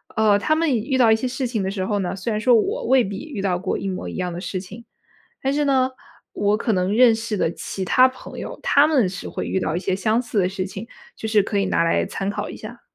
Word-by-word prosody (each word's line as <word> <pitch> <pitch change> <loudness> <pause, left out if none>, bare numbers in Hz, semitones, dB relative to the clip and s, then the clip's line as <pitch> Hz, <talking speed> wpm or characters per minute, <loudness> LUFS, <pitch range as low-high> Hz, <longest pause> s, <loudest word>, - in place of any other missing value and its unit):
呃， 210 -2 +4
他 310 +9 +1
们 320 -3 +1
以 235 - +2
遇 265 - +1
到 235 -3 +5
一 220 - +6
些 240 +3 -2
事 255 +1 -3
情 235 -4 -2
的 190 - -1
时 190 -1 -3
候 205 +1 -1
呢， 185 0 -2
虽 210 +5 -3
然 215 - -1
说 245 +1 +5
我 425 - 0
未 260 -2 +5
必 195 0 -5
遇 260 -9 -6
到 185 -2 0
过 190 - -2
一 195 - -4
模 185 -1 -4
一 - - -7
样 180 -1 -2
的 170 - -5
事 185 -1 -4
情。 210 +5 -11 0.6
但 270 - +1
是 295 0 +1
呢， 265 -2 +2 0.4
我 205 +1 +1
可 225 0 -1
能 185 +1 +1
认 245 -1 +7
识 225 -1 -3
的 165 - +1
其 190 +2 -5
他 255 +7 +5
朋 255 0 -11
友， - - -6
他 285 +1 +5
们 265 -11 +3
是 180 0 -6
会 - - -4
遇 - - 0
到 160 - -1
一 - - -2
些 190 0 -1
相 215 +3 +1
似 235 -3 -3
的 180 -2 +3
事 190 0 -3
情， 195 +3 -8 0.3
就 220 - -5
是 215 -2 +4
可 200 +1 -2
以 195 - +2
拿 165 - +1
来 165 - +2
参 195 - -4
考 - - -4
一 - - -8
下。 - - -10
210 Hz, 305 characters per minute, -22 LUFS, 190-255 Hz, 0.6 s, 认